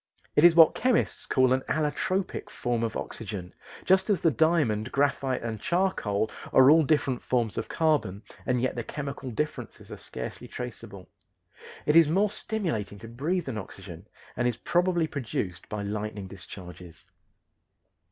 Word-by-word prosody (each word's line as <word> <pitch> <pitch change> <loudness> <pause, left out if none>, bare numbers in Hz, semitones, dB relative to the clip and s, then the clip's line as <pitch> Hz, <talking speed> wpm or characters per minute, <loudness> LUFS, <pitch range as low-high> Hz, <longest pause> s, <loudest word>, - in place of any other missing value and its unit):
It 150 - +4
is 170 -1 +8
what 165 -2 +8
chemists 255 -2 +1
call 130 -1 +3
an 130 - +1
allotropic 160 +5 -1
form 120 -2 -2
of 115 -1 -2
oxygen, 100 -5 -6 0.3
just 190 +3 +3
as 200 -5 +3
the 165 - +3
diamond, 135 -7 +2
graphite, 140 -3 0
and 110 -2 -4
charcoal 115 - 0 0.2
are 130 +2 +7
all 160 +1 +7
different 140 -4 +1
forms 120 -4 0
of - - -4
carbon, 150 - 0 0.2
and 125 -1 +2
yet 130 +1 0
the 120 - -4
chemical 140 0 -5
differences 150 +6 -5
are - - -6
scarcely 60 - -6
traceable. 105 -6 -8 0.8
It 150 - +2
is 165 -3 +7
more 195 +5 +2
stimulating 160 - -3
to 115 +3 -10
breathe 150 +10 -2
than 120 -5 -4
oxygen 95 -1 -10 0.3
and 120 - +1
is 120 - -1
probably 175 -1 +1
produced 110 - -4
by 105 -1 -3
lightning 105 0 -4
discharges. 90 -3 -11
130 Hz, 150 wpm, -27 LUFS, 105-160 Hz, 0.8 s, is